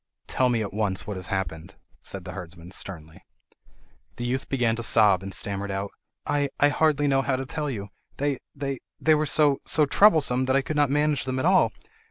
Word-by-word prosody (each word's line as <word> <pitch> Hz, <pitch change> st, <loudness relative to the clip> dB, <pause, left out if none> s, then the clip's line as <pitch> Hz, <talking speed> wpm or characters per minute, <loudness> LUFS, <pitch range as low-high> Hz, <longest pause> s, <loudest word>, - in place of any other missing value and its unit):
"Tell 130 Hz, -1 st, +1 dB
me 115 Hz, -2 st, +1 dB
at 100 Hz, -, -6 dB
once 105 Hz, -3 st, -1 dB
what 105 Hz, -, -5 dB
has 95 Hz, 0 st, -7 dB
happened," 95 Hz, -2 st, -4 dB, 0.3 s
said -, -, -5 dB
the -, -, -6 dB
herdsman 85 Hz, 0 st, -9 dB
sternly. 85 Hz, -2 st, -5 dB, 0.9 s
The 120 Hz, -, -5 dB
youth 130 Hz, +2 st, -2 dB
began 120 Hz, -4 st, +1 dB
to -, -, -3 dB
sob, 105 Hz, -5 st, +4 dB
and 95 Hz, 0 st, -7 dB
stammered 100 Hz, 0 st, -3 dB
out: 100 Hz, +1 st, -3 dB, 0.3 s
"I—I 145 Hz, 0 st, +1 dB
hardly 150 Hz, -1 st, +2 dB
know 135 Hz, -1 st, +3 dB
how 135 Hz, -1 st, 0 dB
to 135 Hz, +1 st, -4 dB
tell 150 Hz, +3 st, -3 dB
you! 100 Hz, -6 st, -5 dB, 0.3 s
They—they—they 140 Hz, +2 st, -2 dB
were 155 Hz, 0 st, +1 dB
so—so 150 Hz, +1 st, +3 dB
troublesome—that 135 Hz, -7 st, +4 dB
I 135 Hz, -, +2 dB
could 155 Hz, -, -4 dB
not 145 Hz, -2 st, +3 dB
manage 150 Hz, -1 st, +1 dB
them 130 Hz, 0 st, -2 dB
at 130 Hz, -, -1 dB
all. 185 Hz, +1 st, +4 dB
130 Hz, 185 wpm, -25 LUFS, 100-145 Hz, 0.9 s, sob